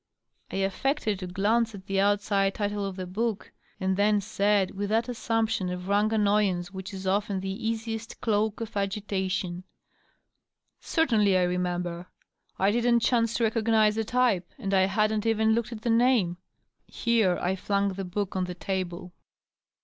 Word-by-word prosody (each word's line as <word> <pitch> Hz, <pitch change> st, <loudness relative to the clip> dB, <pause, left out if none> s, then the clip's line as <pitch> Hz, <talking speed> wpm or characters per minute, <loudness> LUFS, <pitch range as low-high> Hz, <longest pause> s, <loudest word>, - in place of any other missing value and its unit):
I -, -, -5 dB
affected 205 Hz, +3 st, 0 dB
to 185 Hz, -, -5 dB
glance 215 Hz, +4 st, +1 dB
at 190 Hz, -1 st, -12 dB
me 195 Hz, 0 st, 0 dB
outside 200 Hz, -1 st, +2 dB
title 205 Hz, -1 st, -2 dB
of 195 Hz, -, -6 dB
the 185 Hz, -1 st, -5 dB
book, 210 Hz, +3 st, -3 dB, 0.3 s
and 190 Hz, -1 st, 0 dB
then 205 Hz, +1 st, +3 dB
said, 200 Hz, -1 st, +1 dB
with 200 Hz, +1 st, -4 dB
that 225 Hz, +2 st, +1 dB
assumption 225 Hz, -5 st, -1 dB
of 180 Hz, 0 st, -5 dB
rank 205 Hz, +2 st, +2 dB
annoyance 200 Hz, -4 st, +1 dB
which 190 Hz, +1 st, -7 dB
is 190 Hz, -1 st, -7 dB
often 200 Hz, +1 st, 0 dB
the 195 Hz, +4 st, -4 dB
easiest 225 Hz, 0 st, -4 dB
cloak 220 Hz, 0 st, 0 dB
for 205 Hz, -, -4 dB
agitation, 190 Hz, -3 st, -2 dB, 0.6 s
" -, -, -54 dB, 0.2 s
Certainly 220 Hz, -, +2 dB
I 180 Hz, -, +3 dB
remember. 180 Hz, -1 st, -2 dB, 0.5 s
I 195 Hz, +2 st, +3 dB
didn't 235 Hz, +1 st, +2 dB
chance 230 Hz, -1 st, +2 dB
to 235 Hz, -, 0 dB
recognize 220 Hz, -1 st, +3 dB
the 225 Hz, +1 st, -1 dB
type, 230 Hz, -6 st, +1 dB
and 195 Hz, 0 st, -3 dB
I 190 Hz, -1 st, +4 dB
hadn't 215 Hz, +2 st, +1 dB
even 220 Hz, 0 st, +3 dB
looked 235 Hz, +1 st, -1 dB
at 215 Hz, -2 st, -8 dB
the 235 Hz, -, +1 dB
name." 230 Hz, -7 st, +3 dB, 0.5 s
Here 225 Hz, -6 st, +1 dB
I 180 Hz, +2 st, 0 dB
flung 200 Hz, +1 st, 0 dB
the 195 Hz, +1 st, -5 dB
book 190 Hz, +2 st, -3 dB
on 185 Hz, -1 st, 0 dB
the 180 Hz, 0 st, -6 dB
table. 180 Hz, -1 st, -4 dB
205 Hz, 165 wpm, -27 LUFS, 190-225 Hz, 0.6 s, I